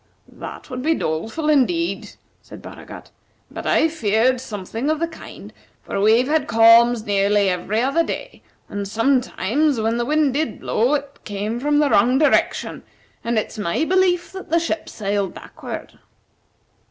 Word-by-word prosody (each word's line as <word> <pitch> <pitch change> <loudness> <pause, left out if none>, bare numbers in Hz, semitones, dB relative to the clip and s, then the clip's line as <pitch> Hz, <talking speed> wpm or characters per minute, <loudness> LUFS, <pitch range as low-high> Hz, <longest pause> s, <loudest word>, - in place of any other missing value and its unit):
"That - - -10
would 250 0 -4
be 320 +4 +1
doleful, 220 - -3
indeed," 320 +4 +1 0.3
said - - -12
Baragat; - - -11 0.4
"but - - -6
I've 320 0 +2
feared 235 -1 +1
something 220 +5 -4
of 310 - +1
the 335 - 0
kind, 325 - -12 0.3
for 195 - -3
we've 225 +5 +4
had 300 -1 +1
calms 230 0 +5
nearly 200 0 +2
every 185 +5 -1
other 275 +6 +2
day, - - -6 0.3
and 200 -1 -5
sometimes, 255 +3 +1
when 225 +1 0
the 240 - -1
wind 300 -1 +2
did 305 +3 -2
blow, 245 +7 +1
it 280 -1 -6
came 210 +3 -4
from 295 +3 +1
the 295 -1 +2
wrong 245 +6 +4
direction, 300 +1 +1 0.4
and 235 0 -1
it's 215 +1 -3
my 200 - 0
belief 365 -1 +1
that 380 0 -9
the 335 +2 +3
ship 330 -1 -3
sailed 200 -2 -2
backward." - - -9
245 Hz, 155 wpm, -21 LUFS, 215-305 Hz, 0.4 s, calms